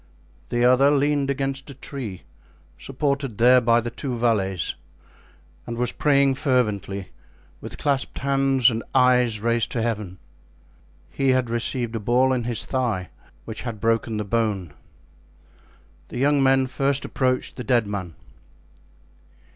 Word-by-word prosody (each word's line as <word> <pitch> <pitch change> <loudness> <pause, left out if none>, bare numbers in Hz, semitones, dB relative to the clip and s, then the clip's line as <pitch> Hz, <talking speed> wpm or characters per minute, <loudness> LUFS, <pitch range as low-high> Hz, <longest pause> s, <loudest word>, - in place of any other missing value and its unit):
The 120 0 +1
other 130 +3 +5
leaned 145 -1 +1
against 135 0 -3
a 140 - -9
tree, 120 -9 -7 0.6
supported 140 -3 -2
there 125 +2 +6
by 115 0 +4
the 120 0 -4
two 125 0 -4
valets, 100 -7 0 0.9
and 120 -1 -5
was 125 0 0
praying 140 -2 +3
fervently, 105 -8 -1 0.5
with - - -8
clasped 140 -2 -1
hands 135 -2 +3
and 115 0 -3
eyes 125 -4 +4
raised 115 0 0
to 120 - -1
Heaven. 105 -5 -3 0.9
He 135 -1 0
had 130 -2 +1
received 120 0 -2
a - - -1
ball 125 +5 +2
in 120 -2 -2
his 120 -3 -3
thigh, 115 -9 -2 0.4
which 110 -1 -6
had 115 -4 -5
broken 115 0 0
the 105 - -2
bone. 100 -7 -1 1.3
The - - -8
young 140 +2 +3
men 135 0 +4
first 140 +2 -1
approached 130 -2 -1
the 125 - -6
dead 120 -1 +2
man. 95 -5 -5
125 Hz, 140 wpm, -23 LUFS, 115-135 Hz, 1.3 s, there